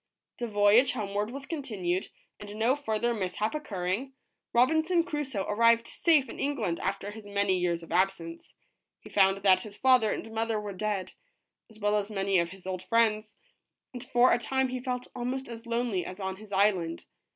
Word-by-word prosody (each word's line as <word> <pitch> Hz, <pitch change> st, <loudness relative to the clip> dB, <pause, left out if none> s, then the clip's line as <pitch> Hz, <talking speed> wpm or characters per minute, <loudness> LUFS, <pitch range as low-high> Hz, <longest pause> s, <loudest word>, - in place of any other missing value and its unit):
The 240 Hz, -, -2 dB
voyage 210 Hz, +4 st, +4 dB
homeward 205 Hz, -2 st, -2 dB
was 270 Hz, +2 st, -7 dB
continued; 205 Hz, -, -3 dB, 0.3 s
and 205 Hz, 0 st, -9 dB
no 230 Hz, +5 st, +2 dB
further 240 Hz, -4 st, -1 dB
mishap 210 Hz, +1 st, -2 dB
occurring, 215 Hz, -2 st, -3 dB, 0.4 s
Robinson 320 Hz, +8 st, +3 dB
Crusoe 295 Hz, -, -3 dB
arrived 230 Hz, +2 st, +4 dB
safe 305 Hz, -3 st, +2 dB
in -, -, -9 dB
England 235 Hz, -12 st, -1 dB
after 195 Hz, +1 st, -3 dB
his 215 Hz, -1 st, -11 dB
many 200 Hz, -1 st, +1 dB
years 170 Hz, -1 st, -1 dB
of -, -, -12 dB
absence. 175 Hz, -2 st, -1 dB, 0.5 s
He -, -, -13 dB
found 195 Hz, -1 st, +4 dB
that 190 Hz, -2 st, +5 dB
his 210 Hz, -3 st, -10 dB
father 255 Hz, -5 st, +4 dB
and 225 Hz, -, -5 dB
mother 225 Hz, 0 st, -1 dB
were 205 Hz, -1 st, -6 dB
dead, 205 Hz, -1 st, -3 dB, 0.6 s
as 220 Hz, -, -16 dB
well 205 Hz, 0 st, +1 dB
as 205 Hz, 0 st, -2 dB
many 195 Hz, -2 st, +1 dB
of 170 Hz, 0 st, 0 dB
his 190 Hz, +1 st, -13 dB
old 185 Hz, -1 st, -4 dB
friends, 215 Hz, -1 st, +1 dB, 0.6 s
and 245 Hz, -, -7 dB
for 245 Hz, +1 st, +4 dB
a -, -, +2 dB
time 265 Hz, +2 st, 0 dB
he 255 Hz, 0 st, -3 dB
felt 250 Hz, -1 st, -3 dB
almost 255 Hz, +2 st, -3 dB
as 235 Hz, 0 st, -9 dB
lonely 235 Hz, -6 st, -1 dB
as 185 Hz, -, -8 dB
on 190 Hz, -1 st, -4 dB
his 210 Hz, 0 st, -13 dB
island. 190 Hz, -4 st, +1 dB
215 Hz, 180 wpm, -29 LUFS, 195-245 Hz, 0.6 s, that